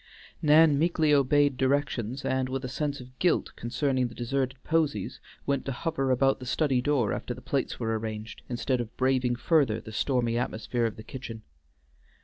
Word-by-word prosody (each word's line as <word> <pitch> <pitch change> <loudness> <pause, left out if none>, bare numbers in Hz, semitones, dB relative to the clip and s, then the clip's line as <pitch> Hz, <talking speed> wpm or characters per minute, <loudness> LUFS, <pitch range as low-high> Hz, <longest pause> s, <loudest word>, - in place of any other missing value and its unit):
Nan 150 -1 +6
meekly 160 -2 +3
obeyed 145 0 +3
directions, 130 -3 0
and 130 -1 0
with 135 0 -3
a - - -2
sense 145 +2 -2
of 125 0 -13
guilt 180 - +2
concerning 130 +1 0
the 115 - -12
deserted 130 +2 -1
posies 150 -11 0 0.3
went 140 -1 0
to 135 - -2
hover 135 0 -1
about 135 +1 +3
the 130 - -8
study 135 -2 +1
door 130 -5 +1
after 125 - -4
the - - -10
plates 135 +1 -2
were 115 -2 -1
arranged, 110 0 -6
instead 125 +1 0
of 115 -2 -8
braving 130 -1 +2
further 125 -4 +2
the 110 - -10
stormy 120 0 0
atmosphere 120 0 -1
of 110 - -6
the 110 - -10
kitchen. 115 -2 -8
130 Hz, 175 wpm, -28 LUFS, 120-140 Hz, 0.3 s, Nan